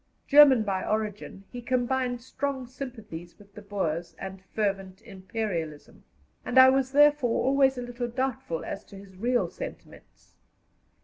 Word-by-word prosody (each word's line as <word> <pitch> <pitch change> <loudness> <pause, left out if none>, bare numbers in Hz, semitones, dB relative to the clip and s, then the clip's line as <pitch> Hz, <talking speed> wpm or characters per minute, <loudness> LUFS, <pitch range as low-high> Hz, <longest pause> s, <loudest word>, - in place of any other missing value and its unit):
German 280 -5 +7
by 195 -2 -2
origin, 210 -2 -3
he 245 - -7
combined 245 0 -1
strong 270 0 -3
sympathies 220 -10 -9
with 200 -1 -19
the 210 - -10
Boers 175 -5 -3
and 190 -1 -8
fervent 195 -3 -2
Imperialism, 185 -6 -5 0.4
and 250 - -2
I 260 0 +10
was 265 0 +1
therefore 290 -4 +4
always 270 0 +3
a 245 - -3
little 245 0 -4
doubtful 240 -9 -3
as 195 - -6
to 200 - -14
his 195 -1 -13
real 240 +5 +1
sentiments. - - -11
230 Hz, 140 wpm, -27 LUFS, 195-260 Hz, 0.4 s, I